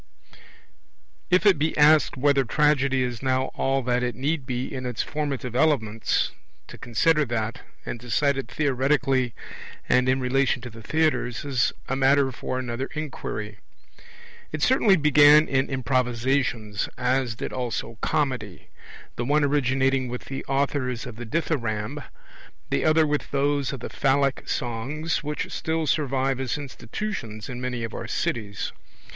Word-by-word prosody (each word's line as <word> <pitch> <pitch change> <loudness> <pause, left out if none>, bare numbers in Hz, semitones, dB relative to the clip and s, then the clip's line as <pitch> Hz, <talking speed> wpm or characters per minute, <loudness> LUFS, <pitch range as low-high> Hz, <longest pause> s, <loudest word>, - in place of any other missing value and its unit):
If 180 +3 +3
it 195 -7 +5
be 155 +2 0
asked 150 -1 +5
whether 140 0 +3
Tragedy 140 0 +2
is 120 -2 -4
now 130 0 0
all 135 0 0
that 125 0 +1
it 125 -2 -1
need 140 +1 -2
be 125 -1 -2
in 130 -1 -4
its 120 -2 -2
formative 140 -5 -3
elements, 115 -7 +1 0.4
to - - -11
consider 150 +7 +2
that, 115 -1 -3 0.2
and 120 - -5
decide 135 +4 +1
it 135 -3 -4
theoretically 135 -2 +1 0.5
and 125 0 +3
in 130 +1 +2
relation 130 0 +1
to 120 - -7
the 115 +1 -11
theatres, 140 -2 0
is 130 -4 +1 0.2
a 135 - -1
matter 135 0 +3
for 130 +1 -4
another 130 +1 -3
inquiry. 110 -8 -5 0.9
It 155 -1 -3
certainly 235 -6 +5
began 150 -1 +6
in 135 0 +1
improvisations 125 -4 0
as 125 -2 0
did - - -5
also 120 -2 -4
Comedy; 125 -10 -2 0.5
the 120 - -2
one 145 +3 +3
originating 135 -2 +2
with 125 0 -6
the 135 0 -5
authors 135 -3 -1
of 120 -3 -8
the 120 -1 -7
Dithyramb, 115 -8 -2 0.7
the - - +1
other 155 0 +5
with 150 -1 -1
those 140 -1 +1
of 135 - -6
the - - -5
phallic 135 0 +1
songs, 135 +9 -2
which 150 0 -3
still 160 0 -1
survive 135 -3 0
as 135 +1 -2
institutions 130 - -6
in 125 -1 -6
many 125 -2 -3
of 115 - -5
our 115 - -5
cities. 105 -3 -2
130 Hz, 150 wpm, -25 LUFS, 120-145 Hz, 0.9 s, began